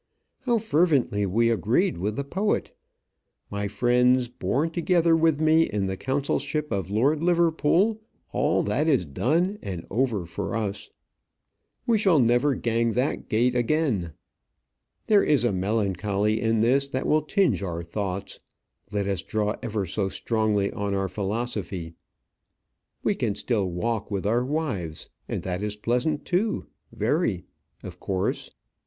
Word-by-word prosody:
How 240 -1 +4
fervently 145 - +2
we 115 +5 +2
agreed 115 - +1
with 105 +4 -2
the 140 - -2
poet! 195 +9 -1 0.8
My 100 0 -2
friends, 125 +3 +2
born 125 - -1
together 170 -1 +3
with 160 -2 +2
me 160 +1 +4
in 100 -2 -1
the 95 0 -2
consulship 140 +4 -2
of 95 -2 -2
Lord 135 +9 +2
Liverpool, 170 +5 +2 0.3
all - - +1
that 125 +10 0
is 135 - +3
done 165 - 0
and 90 -4 -6
over 110 -4 0
for 100 +6 -4
us. 105 -3 -3 1.0
We 230 -2 +3
shall 190 -6 +4
never 125 +2 +3
gang 115 -1 0
that 125 +5 -1
gait' 120 +3 +2
again. 120 - 0 0.9
There 210 -2 +4
is 140 -6 +3
a 120 - +2
melancholy 100 +1 0
in 115 -1 +2
this 135 +4 +2
that 130 -1 -2
will 155 0 +3
tinge 155 - +1
our 85 -3 -4
thoughts, 95 +2 -4 0.5
let 100 -1 -1
us 95 -3 -1
draw 105 +3 -1
ever 105 -3 -2
so 95 +2 -1
strongly 105 -2 0
on 100 -1 -2
our 95 -1 -1
philosophy. 100 -4 -3 1.1
We - - +2
can 100 - -1
still 105 -3 0
walk 110 +5 -2
with 100 -2 -3
our 115 +4 +2
wives; 125 - -3 0.2
and - - -3
that 90 0 -3
is 105 0 -2
pleasant 125 +8 -1
too, 195 - 0 0.3
very - - 0 0.4
of - - -9
course. 95 -1 -2
115 Hz, 145 wpm, -25 LUFS, 100-150 Hz, 1.1 s, How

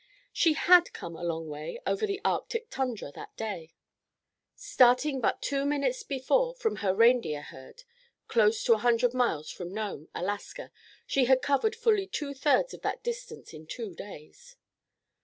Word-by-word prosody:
She 330 -3 +3
had 350 +2 +5
come 170 -1 -7
a 175 - -9
long 165 -1 -3
way 150 - -6
over 430 - 0
the 400 -1 -3
Arctic 460 -1 -1
tundra 250 - -3
that - - -11
day. 175 -8 -6 0.8
Starting 265 -7 +3
but - - 0
two 275 -1 0
mornings 295 - 0
before 460 - 0
from 480 -3 -2
her 195 -3 +1
reindeer 230 -10 +3
herd, 130 - -13 0.4
close 220 -1 +3
to 230 - +5
a 220 - 0
hundred 240 +1 +2
miles 235 -12 0
from 175 -1 -7
Nome, 205 -7 -5
Alaska, 205 - -5 0.3
she 270 -2 +2
had 260 +1 +3
covered 360 - +1
fully 445 -4 +2
two 295 -7 -4
thirds 295 - +2
of - - -10
that - - -3
distance 480 - -6
in 155 0 -11
two 220 0 -6
days. 205 - -12
255 Hz, 160 wpm, -29 LUFS, -, 0.8 s, had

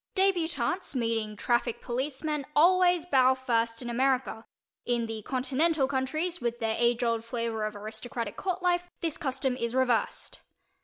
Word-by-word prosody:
Débutantes 365 -2 +1
meeting 225 -3 -1
traffic 240 +2 0
policemen 280 +4 -2
always 355 +1 +5
bow 260 -5 +4
first 230 -2 -1
in - - -6
America; 255 -1 0 0.4
in 240 -1 0
the 225 -1 -5
Continental 270 +5 +1
countries, 310 +6 -1
with 240 0 -1
their 225 -1 -1
age 240 0 +2
old 230 -1 0
flavor 230 -2 -2
of 215 0 -4
aristocratic 220 +1 -5
court 370 -1 -3
life, 355 0 +1
this 325 -2 -2
custom 265 -4 -1
is 235 -1 -3
reversed. 250 -3 0
255 Hz, 145 wpm, -28 LUFS, 230-315 Hz, 0.4 s, always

